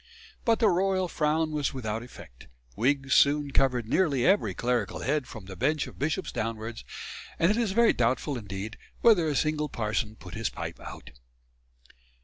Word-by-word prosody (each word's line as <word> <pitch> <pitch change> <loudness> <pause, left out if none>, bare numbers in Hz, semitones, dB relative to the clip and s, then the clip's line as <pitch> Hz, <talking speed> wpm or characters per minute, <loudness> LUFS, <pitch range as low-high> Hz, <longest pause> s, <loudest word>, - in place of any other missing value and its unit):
But 230 -2 +4
the 220 - +4
royal 190 0 +2
frown 155 -1 0
was 145 -3 -1
without 110 -3 -3
effect. 90 - -13 0.3
Wigs 135 +4 +1
soon 145 0 +4
covered 125 -4 +2
nearly 140 -3 +2
every 200 +2 +3
clerical 125 0 -1
head 145 -1 0
from 110 -4 -9
the 95 0 -8
bench 145 +7 +1
of - - -12
bishops 155 +5 -1
downwards; 115 0 -4 0.5
and 170 +4 +4
it 215 - +1
is 225 -5 0
very 235 +1 +5
doubtful 125 +4 0
indeed 105 -1 -6 0.2
whether 200 -9 +5
a 150 - 0
single 150 +1 0
parson 110 0 -2
put 90 -2 -11
his 115 0 -1
pipe - - -6
out. - - -10
140 Hz, 165 wpm, -28 LUFS, 115-160 Hz, 0.5 s, very